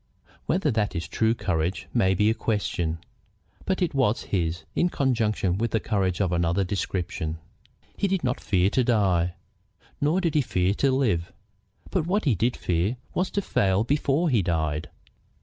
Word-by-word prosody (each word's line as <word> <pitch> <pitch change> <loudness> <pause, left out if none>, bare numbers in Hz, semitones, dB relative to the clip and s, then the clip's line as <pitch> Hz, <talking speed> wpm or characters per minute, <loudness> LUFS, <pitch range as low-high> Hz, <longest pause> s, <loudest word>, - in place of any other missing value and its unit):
Whether 165 -4 +1
that 105 -3 0
is 85 -1 -3
true 110 +1 +1
courage 90 -2 -1
may 95 -6 +3
be 105 +3 +3
a - - +2
question, 100 -7 -1 0.7
but 190 -1 0
it 175 - -1
was 125 -5 +1
his, 85 -2 -2
in 175 - +2
conjunction 110 - 0
with 115 0 +1
courage 95 -5 0
of 95 -3 +1
another 85 +2 +1
description. 90 -4 -3 0.6
He 200 - +1
did 190 -2 -1
not 125 -1 -1
fear 95 0 +2
to 130 - +2
die, 95 -7 +2 0.7
nor 150 +6 +2
did 170 -5 0
he 150 - +4
fear 95 -6 +1
to 135 +5 +2
live. 110 -11 +1 0.6
But 155 - 0
what 200 +3 +1
he 135 - +4
did 115 +5 0
fear 90 +8 0 0.2
was 180 +1 0
to 200 - -2
fail 95 - +2
before 145 +5 +1
he 120 -7 +3
died. 80 -3 -1
105 Hz, 165 wpm, -26 LUFS, 90-135 Hz, 0.7 s, he